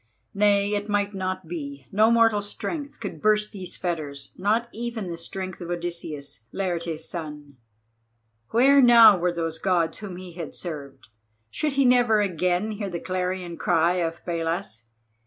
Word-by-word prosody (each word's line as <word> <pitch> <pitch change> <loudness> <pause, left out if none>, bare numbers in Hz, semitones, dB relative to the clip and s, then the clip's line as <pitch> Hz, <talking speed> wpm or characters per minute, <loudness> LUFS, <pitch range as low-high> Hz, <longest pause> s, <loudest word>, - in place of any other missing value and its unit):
Nay, 205 0 +3
it 205 +1 -2
might 205 0 0
not 185 -2 -3
be, 140 -5 -6
no 215 +3 +4
mortal 230 -3 +4
strength 285 +8 -5
could - - -6
burst 210 0 +2
these 190 -3 -7
fetters, 145 -6 -4
not 215 +5 +1
even 230 -2 -4
the 175 -2 -4
strength 185 +3 -6
of 175 - -6
Odysseus, 170 -5 -5
Laertes' 170 -4 -3
son. 150 -4 -7 0.9
Where 275 +4 +5
now 230 -4 +9
were 175 +1 +1
those 165 -1 -3
Gods 175 -4 +1
whom 200 -4 -7
he 180 -1 -9
had 165 -2 -7
served? 145 -9 -8 0.4
Should 300 -2 -1
he 275 0 +3
never 245 -3 +5
again 180 +1 0
hear 205 -2 -4
the 175 -2 -4
clarion 180 -1 -3
cry 170 +3 +2
of 165 -1 -3
Pallas? 165 - -3
185 Hz, 155 wpm, -25 LUFS, 165-210 Hz, 0.9 s, now